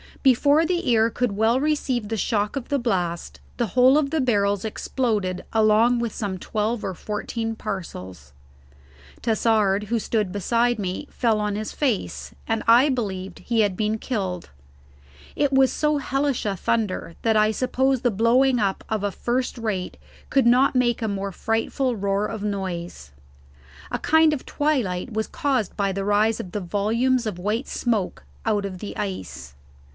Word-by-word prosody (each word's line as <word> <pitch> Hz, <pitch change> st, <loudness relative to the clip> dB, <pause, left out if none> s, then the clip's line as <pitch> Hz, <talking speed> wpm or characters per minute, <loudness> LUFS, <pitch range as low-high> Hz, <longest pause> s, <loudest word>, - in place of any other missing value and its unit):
Before 285 Hz, +4 st, +4 dB
the 350 Hz, -6 st, 0 dB
ear 225 Hz, -1 st, +4 dB
could 245 Hz, 0 st, -1 dB
well 225 Hz, +4 st, +3 dB
receive 270 Hz, -6 st, 0 dB
the 225 Hz, -, -2 dB
shock 210 Hz, +1 st, 0 dB
of 270 Hz, -3 st, -5 dB
the 285 Hz, -1 st, +1 dB
blast 180 Hz, -8 st, -2 dB, 0.2 s
the 240 Hz, -2 st, 0 dB
whole 255 Hz, +6 st, +5 dB
of 285 Hz, -2 st, 0 dB
the 320 Hz, -2 st, +1 dB
barrels 205 Hz, -5 st, +1 dB
exploded 210 Hz, -5 st, -2 dB
along 220 Hz, +2 st, +4 dB
with 235 Hz, -2 st, -2 dB
some 200 Hz, -3 st, -3 dB
twelve 215 Hz, +4 st, -2 dB
or 190 Hz, -, -2 dB
fourteen 225 Hz, +4 st, -4 dB
parcels. 95 Hz, -, -7 dB, 0.9 s
Tassard, 215 Hz, -3 st, +2 dB
who 230 Hz, +3 st, 0 dB
stood 210 Hz, -3 st, -1 dB
beside 235 Hz, +5 st, +1 dB
me, 190 Hz, +8 st, -3 dB
fell 225 Hz, -3 st, +1 dB
on 210 Hz, -1 st, -1 dB
his 215 Hz, +1 st, -4 dB
face, 260 Hz, -9 st, -2 dB
and 225 Hz, -1 st, 0 dB
I 240 Hz, +5 st, +6 dB
believed 195 Hz, -7 st, -3 dB
he 230 Hz, -2 st, +1 dB
had 205 Hz, -3 st, +1 dB
been 215 Hz, +2 st, 0 dB
killed. 190 Hz, -9 st, -3 dB, 0.9 s
It 285 Hz, -1 st, +1 dB
was 265 Hz, -1 st, +5 dB
so 300 Hz, -1 st, +1 dB
hellish 275 Hz, -1 st, -1 dB
a 200 Hz, -2 st, 0 dB
thunder 190 Hz, -5 st, -1 dB
that 225 Hz, -1 st, +2 dB
I 215 Hz, 0 st, +4 dB
suppose 260 Hz, +2 st, +1 dB
the 245 Hz, -, +2 dB
blowing 240 Hz, +5 st, +3 dB
up 195 Hz, -2 st, -1 dB
of 215 Hz, -2 st, -1 dB
a 205 Hz, -, 0 dB
first 250 Hz, +5 st, -2 dB
rate 210 Hz, -6 st, -3 dB, 0.3 s
could 270 Hz, -3 st, +3 dB
not 260 Hz, +3 st, +4 dB
make 240 Hz, -2 st, +2 dB
a -, -, 0 dB
more 200 Hz, -1 st, -3 dB
frightful 225 Hz, +5 st, -1 dB
roar 200 Hz, 0 st, 0 dB
of 215 Hz, -2 st, -6 dB
noise. 180 Hz, -, -4 dB, 0.8 s
A -, -, -2 dB
kind 320 Hz, 0 st, +4 dB
of 285 Hz, -, -4 dB
twilight 250 Hz, -9 st, -1 dB
was 220 Hz, 0 st, -1 dB
caused 260 Hz, -8 st, -1 dB
by 200 Hz, -1 st, +1 dB
the 195 Hz, +1 st, -3 dB
rise 210 Hz, +2 st, +2 dB
of 180 Hz, -, -6 dB
the 210 Hz, -, -2 dB
volumes 230 Hz, +7 st, +1 dB
of 210 Hz, -5 st, -4 dB
white 215 Hz, +8 st, -1 dB
smoke 220 Hz, -7 st, -1 dB, 0.2 s
out 210 Hz, -3 st, +1 dB
of 185 Hz, -2 st, -6 dB
the 205 Hz, -, -7 dB
ice. 70 Hz, -, -5 dB
220 Hz, 170 wpm, -24 LUFS, 200-250 Hz, 0.9 s, I